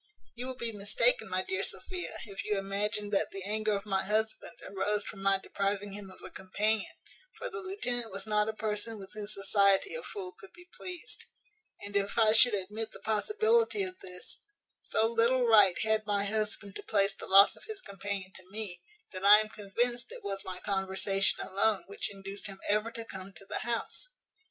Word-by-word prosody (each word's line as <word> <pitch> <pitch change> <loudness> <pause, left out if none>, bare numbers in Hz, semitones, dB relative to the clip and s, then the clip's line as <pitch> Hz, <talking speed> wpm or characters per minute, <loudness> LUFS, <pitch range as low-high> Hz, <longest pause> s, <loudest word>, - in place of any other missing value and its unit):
"You 245 +2 -6
will 260 - -5
be 235 -2 -3
mistaken, 215 - +2
my - - 0
dear 375 +1 -2
Sophia, 365 -2 -4
if 200 -3 -6
you 210 -1 0
imagine 205 +1 -2
that 200 - +2
the 195 -1 -6
anger 215 +2 0
of 200 0 -2
my 190 -2 0
husband 215 +2 -1
arose 205 +1 0
from 195 - -8
my 195 0 +3
depriving 200 +1 -2
him 200 -1 -7
of 185 - -14
a - - -7
companion; 210 +3 -1 0.4
for - - -5
the 435 - -4
lieutenant 250 - -2
was 195 +2 -4
not 210 0 +2
a - - -2
person 215 +1 -2
with 195 -1 -11
whose 210 0 -4
society 200 - +3
a 485 - -3
fool 390 -6 -6
could 390 +1 -16
be 355 0 -16
pleased; 360 -2 -7 0.6
and, 205 0 -8
if 200 +2 0
I 220 -2 +6
should 235 -1 +7
admit 210 +3 -4
the - - -11
possibility 430 - +3
of 370 -1 -3
this, 180 -1 -8 0.4
so 220 - 0
little 235 +2 +3
right 210 -6 +6
had 220 -1 +1
my 200 -1 +2
husband 210 -1 -1
to - - -6
place 200 -2 +2
the - - -9
loss 195 +1 +8
of - - -13
his 435 -2 -6
companion 195 - -5
to 185 -1 -11
me, 200 -4 -4 0.3
that 185 0 -7
I 205 +1 +10
am 215 0 -2
convinced 240 +4 -2
it - - -9
was 195 -1 -2
my 185 -1 -5
conversation 195 0 +1
alone 200 +2 +1
which 200 - -4
induced 195 +1 -6
him 195 -1 -9
ever 210 +2 +2
to 230 -1 -5
come 190 -2 -6
to 195 - -13
the - - -3
house. 235 - -3
210 Hz, 200 wpm, -31 LUFS, 195-230 Hz, 0.6 s, I